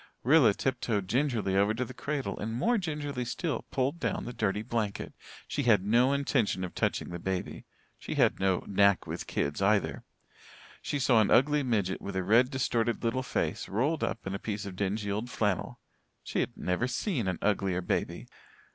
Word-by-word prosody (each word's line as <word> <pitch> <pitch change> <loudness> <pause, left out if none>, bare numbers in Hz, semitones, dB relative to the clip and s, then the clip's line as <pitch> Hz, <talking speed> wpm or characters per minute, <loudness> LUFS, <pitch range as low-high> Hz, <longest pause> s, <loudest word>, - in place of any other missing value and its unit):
Rilla 130 -6 +5
tiptoed 115 -7 -1
gingerly 115 -5 0
over 100 +3 +3
to 125 +2 -1
the 125 - -9
cradle 140 +1 -3
and 110 - -3
more 230 - +2
gingerly 145 -7 -3
still 145 +6 -3
pulled 135 +5 -1
down - - -2
the 120 - -5
dirty 105 -3 -1
blanket. 110 -3 -3 0.3
She 145 - -2
had 110 -7 +3
no 120 +5 +4
intention 135 -9 +1
of 90 - -5
touching - - -1
the 85 0 -5
baby 95 0 -4 0.3
she - - -5
had - - +3
no 95 -1 +1
"knack 100 -1 +3
with - - -5
kids" 70 +6 -2
either. 100 +1 +1 0.8
She 145 - -2
saw 125 -4 +4
an 105 - +2
ugly 145 +3 +4
midget 105 -8 0
with 100 - -6
a 95 - 0
red, 120 +6 +4
distorted 120 -4 0
little 120 +3 0
face, 125 - -2
rolled 140 +10 0
up 115 - -3
in 95 - -3
a 100 - -3
piece 105 -1 -4
of 95 -2 -6
dingy 100 +2 -1
old 110 +5 -3
flannel. 105 -5 -1 0.4
She - - -2
had - - -2
never 90 +7 0
seen 130 - -1
an 90 -2 -1
uglier 95 -3 +1
baby. - - -2
115 Hz, 185 wpm, -29 LUFS, 100-130 Hz, 0.8 s, Rilla